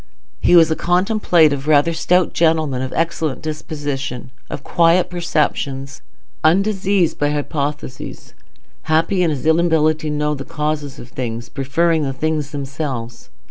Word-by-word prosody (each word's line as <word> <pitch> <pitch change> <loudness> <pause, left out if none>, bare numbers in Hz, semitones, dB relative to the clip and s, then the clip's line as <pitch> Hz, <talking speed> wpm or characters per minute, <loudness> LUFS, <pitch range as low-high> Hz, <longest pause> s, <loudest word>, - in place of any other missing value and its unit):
He - - +4
was 165 -2 +6
a - - +2
contemplative, 175 -6 +2
rather 155 +2 +4
stout 180 +2 +2
gentleman, 160 -6 +1
of 130 0 -4
excellent 165 -4 -1
digestion; 145 -5 -5 0.2
of - - -6
quiet 170 +2 +3
perceptions, 145 -5 -2 0.4
undiseased 190 +1 +2
by 145 - +2
hypothesis; 145 -2 -4 0.6
happy 165 +4 +2
in 175 - +3
his 145 -3 -3
inability 160 -1 +2
to 150 - -2
know 150 0 0
the 140 -2 -5
causes 150 -1 -3
of 120 - -11
things, 120 -1 -5
preferring 160 +5 +1
the 135 -2 -2
things 155 0 -2
themselves. 135 -5 -5
155 Hz, 135 wpm, -19 LUFS, 140-165 Hz, 0.6 s, was